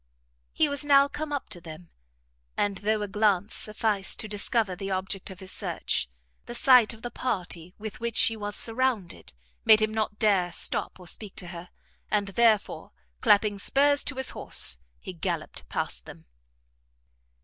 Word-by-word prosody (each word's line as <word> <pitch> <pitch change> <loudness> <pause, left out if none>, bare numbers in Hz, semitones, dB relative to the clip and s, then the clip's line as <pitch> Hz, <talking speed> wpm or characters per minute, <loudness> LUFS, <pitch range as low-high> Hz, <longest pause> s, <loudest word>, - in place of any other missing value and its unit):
He 315 - +2
was 285 0 -3
now 280 -1 +5
come 295 +1 -6
up 285 -2 -3
to 175 - -8
them, 165 +1 -11 0.7
and 200 -1 0
though 210 +1 0
a - - -3
glance 205 0 +1
sufficed 210 -2 0
to 215 - -4
discover 205 -1 0
the 195 +2 -6
object 190 0 -2
of 190 0 -11
his 190 - -5
search, - - -2 0.4
the 240 - -6
sight 250 -4 +6
of 230 -1 -10
the 245 - -5
party 180 -6 -4
with 215 0 -7
which 235 -1 -3
she 225 - +6
was 205 -1 -4
surrounded 230 -6 0 0.3
made 215 - +7
him 215 0 0
not 215 -1 -2
dare 195 -5 +2
stop - - -1
or 180 - -13
speak 205 +2 -5
to 180 -5 -6
her, 175 0 -9 0.4
and 205 -2 0
therefore, 220 0 +1 0.3
clapping 210 -3 +3
spurs 285 +6 +3
to 285 - -2
his 265 0 -1
horse, - - 0 0.2
he 185 - -8
galloped 170 -2 -5
past - - -4
them. 80 - -12
210 Hz, 170 wpm, -27 LUFS, 190-235 Hz, 0.7 s, made